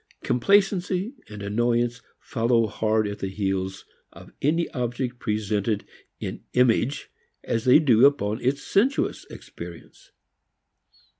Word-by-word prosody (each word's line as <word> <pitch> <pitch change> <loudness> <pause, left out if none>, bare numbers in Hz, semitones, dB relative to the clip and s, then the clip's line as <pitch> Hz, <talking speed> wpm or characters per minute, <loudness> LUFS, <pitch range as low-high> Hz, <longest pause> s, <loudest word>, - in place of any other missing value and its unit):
Complacency 195 - +2 0.2
and 105 -1 -8
annoyance 120 +3 0 0.2
follow 115 0 +1
hard 110 0 0
at 100 0 -6
the 95 - -3
heels 95 -1 -3 0.3
of - - -14
any 165 +4 +1
object 125 0 -3
presented 105 -1 -1 0.3
in - - -6
image 125 +1 +2 0.3
as 115 -1 -2
they 125 - +8
do 135 -5 +6
upon 110 -6 -1
its 135 +3 0
sensuous 245 +8 +1
experience. - - -12
120 Hz, 115 wpm, -25 LUFS, 105-140 Hz, 0.3 s, they